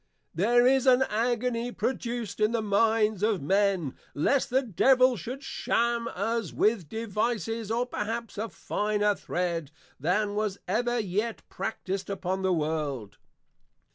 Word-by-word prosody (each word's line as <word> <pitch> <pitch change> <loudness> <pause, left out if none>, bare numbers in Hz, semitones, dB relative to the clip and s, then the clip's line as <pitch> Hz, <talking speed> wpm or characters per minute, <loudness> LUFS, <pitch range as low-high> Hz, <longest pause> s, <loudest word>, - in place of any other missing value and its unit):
There 240 +8 +4
is 265 +1 +4
an 255 0 +6
Agony 240 +1 -1
produced 235 -5 -3
in 215 +2 +2
the 230 -2 0
Minds 215 0 +2
of 210 -2 +2
Men, 190 -2 +1 0.2
lest 265 - +2
the 260 +2 +2
Devil 255 +4 +4
should 250 - -6
sham 235 -3 0
us 225 0 -1
with 210 -8 +1
Devices, 225 0 -2
of 240 +2 -1
perhaps 225 0 -3
a 225 +1 -2
finer 210 0 0
Thred, 170 -5 -2 0.3
than 200 +8 +1
was 210 -2 -1
ever 240 +5 +1
yet 215 +2 -2
practised 195 -3 -4
upon 190 -1 -2
the 190 0 +1
World. 150 - -2
215 Hz, 135 wpm, -28 LUFS, 190-235 Hz, 0.3 s, an